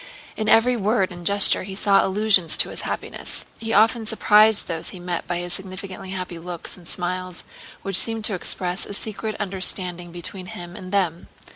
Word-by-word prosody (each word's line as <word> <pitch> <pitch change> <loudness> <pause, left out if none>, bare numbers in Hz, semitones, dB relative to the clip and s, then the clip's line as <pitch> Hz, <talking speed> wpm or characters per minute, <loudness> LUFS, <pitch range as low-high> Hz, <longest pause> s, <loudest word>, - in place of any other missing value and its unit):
In 215 0 -2
every 245 +3 +5
word 210 -3 0
and 175 -1 -4
gesture 200 0 +7
he 190 0 -7
saw 200 0 +3
allusions 195 -4 +3
to - - +4
his - - -2
happiness. - - -5
He 225 0 -4
often 220 +2 +3
surprised 215 0 +4
those 165 -2 -2
he 185 - -9
met 175 -1 -4
by 175 - -1
his 175 0 -4
significantly 190 0 -6
happy 185 -2 -5
looks 175 0 -5
and 175 -3 -12
smiles 180 0 -4 0.4
which 195 -1 +1
seemed 225 -1 0
to 215 - 0
express 180 0 0
a 200 - -5
secret 215 0 -4
understanding 185 -3 -1
between 180 +2 -7
him 175 0 -9
and 185 0 -9
them. 180 -4 -1
190 Hz, 180 wpm, -22 LUFS, 175-210 Hz, 0.4 s, gesture